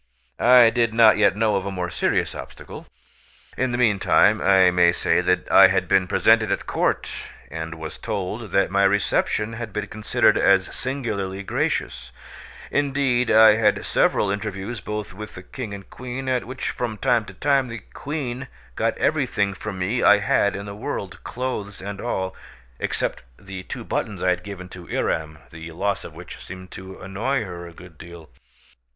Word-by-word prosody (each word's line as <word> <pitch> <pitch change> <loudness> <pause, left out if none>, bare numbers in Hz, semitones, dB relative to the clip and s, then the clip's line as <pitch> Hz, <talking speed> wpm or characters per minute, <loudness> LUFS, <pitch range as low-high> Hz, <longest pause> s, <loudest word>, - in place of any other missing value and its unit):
I 125 -2 +7
did 115 -1 0
not 115 -2 +6
yet 100 -2 +4
know 105 0 +2
of 95 0 -3
a - - -3
more 90 -2 -3
serious - - 0
obstacle. - - -10 0.7
In 130 -1 0
the 120 - -1
meantime, 110 -6 +3
I 95 -1 +5
may 90 -1 +4
say - - +1
that 90 0 0
I - - +9
had - - 0
been 95 -1 +3
presented 110 +2 +3
at 100 - -1
court, - - -1 0.2
and 80 +1 -5
was 80 -1 -8
told 105 +1 -4
that 95 +1 +1
my 100 0 +3
reception 100 +2 +1
had 115 -1 -6
been 105 +1 -3
considered 110 +1 +2
as 95 -1 +3
singularly 100 -8 -3
gracious; - - -2 0.6
indeed, 135 -4 +1
I 110 -1 +7
had 105 -2 +2
several 100 - +2
interviews 100 +2 -4
both 105 0 -5
with 105 +2 -9
the 90 - -9
King 120 +1 -7
and 100 -1 -8
Queen, 125 +1 -7
at 130 -1 0
which 130 +3 -4
from 115 -3 -4
time 120 -1 +2
to 100 - -12
time 135 +2 +2
the 115 -2 -8
Queen 130 -4 -4 0.3
got - - 0
everything 100 -1 0
from 100 0 -6
me 95 +7 -1
that - - +4
I 105 - +8
had 100 0 +1
in 100 +1 -6
the 100 - -7
world, 105 - -6
clothes 120 -6 -4
and 100 +1 -6
all, 95 -6 -3 0.4
except - - -2 0.2
the 95 -2 -8
two - - -7
buttons 100 -4 -3
I 90 - +3
had 90 0 -1
given 90 -1 -8
to 90 -2 -11
Yram, 80 -1 -3
the 80 +1 -9
loss 100 +4 -1
of - - -10
which - - -10
seemed 95 0 -10
to 95 0 -10
annoy 110 +8 -2
her 85 -3 -8
a - - -11
good 85 -1 -15
deal. 85 -2 -12
100 Hz, 180 wpm, -23 LUFS, 95-115 Hz, 0.7 s, I